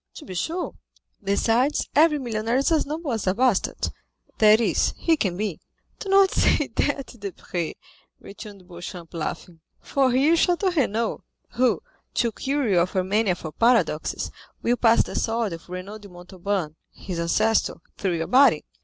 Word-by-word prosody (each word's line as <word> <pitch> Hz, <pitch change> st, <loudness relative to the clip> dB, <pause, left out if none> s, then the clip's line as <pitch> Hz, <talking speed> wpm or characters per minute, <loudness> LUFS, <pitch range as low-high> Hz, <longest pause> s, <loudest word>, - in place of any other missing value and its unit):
"To 305 Hz, -, -10 dB
be 190 Hz, -, -8 dB
sure; 330 Hz, -, -3 dB, 0.5 s
besides, 225 Hz, +7 st, +1 dB
every 305 Hz, +1 st, +5 dB
millionaire 230 Hz, -2 st, -1 dB
is 275 Hz, +5 st, +1 dB
as 315 Hz, -3 st, +2 dB
noble 310 Hz, -1 st, -3 dB
as 220 Hz, -4 st, -2 dB
a 185 Hz, -, +2 dB
bastard—that 220 Hz, -2 st, +1 dB
is, 235 Hz, -, +1 dB
he 330 Hz, -, +2 dB
can 190 Hz, -, -1 dB
be." 205 Hz, -5 st, -3 dB, 0.4 s
"Do 395 Hz, -, -6 dB
not 390 Hz, 0 st, +5 dB
say 295 Hz, -, +2 dB
that, 280 Hz, -3 st, -1 dB
Debray," 180 Hz, -4 st, -5 dB, 0.4 s
returned 200 Hz, -2 st, -11 dB
Beauchamp, 175 Hz, -1 st, -9 dB
laughing, 165 Hz, +1 st, -5 dB, 0.2 s
"for 270 Hz, -2 st, +1 dB
here 275 Hz, +6 st, +4 dB
is 335 Hz, -, +3 dB
Château 360 Hz, +1 st, +1 dB
Renaud, 230 Hz, -5 st, 0 dB, 0.3 s
who, 240 Hz, -7 st, +1 dB, 0.3 s
to 235 Hz, -2 st, +1 dB
cure 275 Hz, +3 st, -1 dB
you 190 Hz, -4 st, +3 dB
of 180 Hz, +3 st, 0 dB
your 185 Hz, -, +2 dB
mania 200 Hz, 0 st, +1 dB
for 160 Hz, -3 st, -7 dB
paradoxes, 235 Hz, +6 st, +1 dB, 0.3 s
will 240 Hz, -, +2 dB
pass 230 Hz, -1 st, +4 dB
the -, -, -8 dB
sword 225 Hz, -4 st, -1 dB
of 165 Hz, +1 st, -10 dB
Renaud 185 Hz, +4 st, -7 dB
de 205 Hz, -1 st, -13 dB
Montauban, 180 Hz, -2 st, -4 dB
his 180 Hz, -3 st, -6 dB
ancestor, 215 Hz, +6 st, +1 dB, 0.2 s
through 185 Hz, -4 st, 0 dB
your 165 Hz, -, -2 dB
body." 255 Hz, -, +4 dB
220 Hz, 160 wpm, -24 LUFS, 185-265 Hz, 0.5 s, every